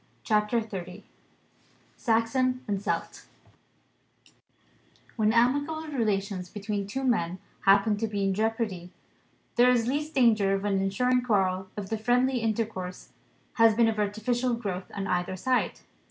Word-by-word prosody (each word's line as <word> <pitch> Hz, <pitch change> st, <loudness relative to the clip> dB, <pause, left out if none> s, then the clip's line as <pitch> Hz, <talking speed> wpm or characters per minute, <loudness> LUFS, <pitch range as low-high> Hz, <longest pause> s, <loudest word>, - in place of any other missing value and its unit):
CHAPTER 215 Hz, +2 st, +1 dB
XXX 190 Hz, -3 st, -7 dB, 0.9 s
SAXON 250 Hz, +2 st, +1 dB
AND 200 Hz, -2 st, -1 dB
CELT -, -, -3 dB, 1.9 s
WHEN 215 Hz, -2 st, +2 dB
amicable 285 Hz, +7 st, +1 dB
relations 200 Hz, -8 st, -1 dB
between 205 Hz, 0 st, -4 dB
two 265 Hz, +6 st, -4 dB
men 185 Hz, -9 st, 0 dB, 0.3 s
happen 200 Hz, +2 st, +4 dB
to 225 Hz, +2 st, -1 dB
be 205 Hz, -2 st, -2 dB
in 195 Hz, 0 st, +1 dB
jeopardy, 215 Hz, -4 st, -2 dB, 0.7 s
there 245 Hz, +1 st, +6 dB
is 240 Hz, -2 st, +3 dB
least 295 Hz, +5 st, -2 dB
danger 215 Hz, -6 st, +4 dB
of 195 Hz, +1 st, -3 dB
an 195 Hz, -2 st, +1 dB
ensuing 250 Hz, +6 st, +1 dB
quarrel 190 Hz, -5 st, 0 dB
if 205 Hz, -2 st, -4 dB
the 220 Hz, -, -1 dB
friendly 250 Hz, +3 st, +2 dB
intercourse 215 Hz, -5 st, -3 dB, 0.5 s
has 225 Hz, -1 st, +6 dB
been 230 Hz, 0 st, +4 dB
of 220 Hz, -1 st, -1 dB
artificial 235 Hz, +4 st, 0 dB
growth, 195 Hz, -5 st, -5 dB
on 200 Hz, -1 st, -3 dB
either 180 Hz, 0 st, -1 dB
side. 250 Hz, +7 st, 0 dB
215 Hz, 135 wpm, -27 LUFS, 195-245 Hz, 1.9 s, there